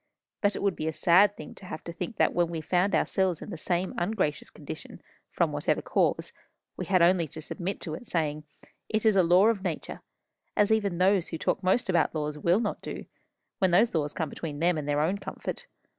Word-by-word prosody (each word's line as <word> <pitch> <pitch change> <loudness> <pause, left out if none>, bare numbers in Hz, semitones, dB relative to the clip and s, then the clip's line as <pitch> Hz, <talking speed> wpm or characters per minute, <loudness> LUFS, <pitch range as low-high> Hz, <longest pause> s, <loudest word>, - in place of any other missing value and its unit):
But 205 -1 +2
it - - -4
would 200 -3 +1
be 155 - -3
a 160 - -1
sad 185 +6 +4
thing 155 - -9
to 195 - -14
have 155 - -7
to 170 - -7
think 220 +5 -6
that - - +3
when 175 0 +2
we 165 -1 -4
found 180 +5 +1
ourselves 185 -4 +1
in - - -8
the - - -4
same 175 +3 -1
ungracious 175 -5 -1
condition, - - -9 0.3
from - - 0
whatever - - 0
cause, - - 0 0.4
we - - -4
had 185 -2 +4
only 175 -1 +4
to 155 - -9
submit 180 +5 -4
to 160 - -4
it, 230 +9 -8
saying, 155 -3 -1 0.5
'It 220 0 0
is 215 -2 +5
a 190 - +6
law 180 +3 +5
of 210 -4 -1
nature,' 175 -5 -4 0.6
as 205 +1 +3
even 205 -5 +1
those 185 0 +3
who 165 - -5
talk - - -1
most 190 +5 +2
about 175 -3 +1
laws 150 -1 -2
will 170 +6 +2
not 220 -3 -2
do, - - -6 0.5
when 190 - +3
those 205 +7 +4
laws 150 -3 0
come 160 -3 -3
between 150 -1 -6
them 170 +3 +2
and 150 -2 -4
their 145 0 +2
own 185 +6 0
comfort. - - -6
175 Hz, 220 wpm, -28 LUFS, 160-195 Hz, 0.6 s, a